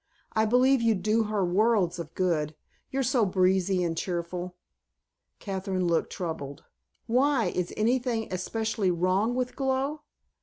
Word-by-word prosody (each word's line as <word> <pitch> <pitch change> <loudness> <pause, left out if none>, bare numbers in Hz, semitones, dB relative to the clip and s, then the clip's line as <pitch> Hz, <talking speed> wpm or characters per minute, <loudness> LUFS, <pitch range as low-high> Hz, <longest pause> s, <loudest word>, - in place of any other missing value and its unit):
I 220 0 +3
believe 250 +3 +4
you'd 225 -5 +1
do 220 +1 +2
her 210 -3 0
worlds 185 -1 +2
of 165 -1 -7
good. 155 -5 0 0.3
You're 270 0 -1
so 250 -2 +2
breezy 185 -1 +2
and 165 -1 -1
cheerful." 175 +1 -4 0.8
Kathryn 190 -2 -3
looked 170 -1 +1
troubled. 150 -5 -5 0.4
"Why, 255 +1 +2
is 180 -1 -2
anything 235 0 +1
especially 215 +2 -1
wrong 185 +7 +1
with 250 0 -2
Glow?" 270 +2 -1
200 Hz, 130 wpm, -27 LUFS, 180-235 Hz, 0.8 s, believe